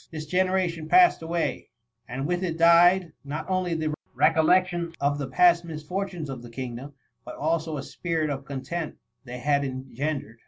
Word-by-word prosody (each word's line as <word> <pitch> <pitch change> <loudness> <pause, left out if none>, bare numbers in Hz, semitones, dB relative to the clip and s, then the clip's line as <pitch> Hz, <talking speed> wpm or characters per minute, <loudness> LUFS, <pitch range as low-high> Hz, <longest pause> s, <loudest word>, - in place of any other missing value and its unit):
This 155 -1 -6
generation 180 -2 0
passed 360 - +6
away, 165 0 -2 0.4
and 130 +3 -4
with 175 +3 -1
it 165 -3 -2
died, 170 +1 +5
not 145 +2 -5
only 185 -2 0
the 155 -1 -1 0.2
recollection 175 +1 +3
of 145 +1 0
the 140 - -3
past 175 +5 +4
mis 155 -3 -7
fortunes 180 -1 -4
of 135 -3 -6
the 120 - -11
kingdom, 130 +3 -7 0.3
but 125 - -9
also 160 0 -1
the 140 - -4
spirit 160 -4 -2
of 140 0 -4
content 145 +4 -5 0.3
they 125 0 -7
had 140 +3 +1
engendered. 130 -2 -4
160 Hz, 165 wpm, -26 LUFS, 140-175 Hz, 0.4 s, passed